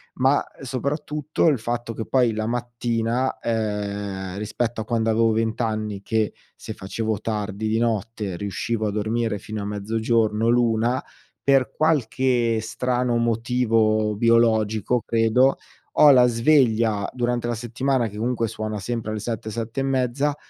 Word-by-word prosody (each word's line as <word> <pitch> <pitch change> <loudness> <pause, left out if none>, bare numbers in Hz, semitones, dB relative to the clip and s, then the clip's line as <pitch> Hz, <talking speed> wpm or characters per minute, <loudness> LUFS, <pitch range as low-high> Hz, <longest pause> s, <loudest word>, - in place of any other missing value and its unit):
Ma 135 +2 +3 0.2
soprattutto 145 +4 -1
il 145 -7 +3
fatto 120 0 -3
che 110 - -5
poi 125 -3 +2
la 110 0 -2
mattina, 120 +1 -1
ehm, 100 -4 -3
rispetto 110 +2 -2
a - - -6
quando 115 -1 0
avevo 115 0 +3
20 110 +1 -1
anni 110 -3 -2
che 110 +1 0 0.2
se - - -7
facevo 110 +2 -3
tardi 105 -1 -3
di 110 +1 +1
notte 110 -4 -2
riuscivo 110 +2 -2
a - - -1
dormire 110 +1 -1
fino 110 +2 -6
a 100 - -4
mezzogiorno 110 +1 0
l'01:00. 120 +1 +2 0.4
Per 135 -2 +3
qualche 125 -6 +1
strano 125 +2 -1
motivo 115 -2 +1
biologico 115 0 +2
credo, 115 +4 +3 0.4
ho 150 - +8
la 125 -2 +6
sveglia 115 -5 +2
durante 120 -1 -1
la 120 - -1
settimana 120 +2 -1
che 105 0 -9
comunque 115 +1 0
suona 110 0 -4
sempre 110 +2 -4
alle 110 - -3
7, 110 0 -4
7 115 +3 -4
e - - +1
mezza. 135 +2 0
115 Hz, 145 wpm, -23 LUFS, 110-120 Hz, 0.4 s, ho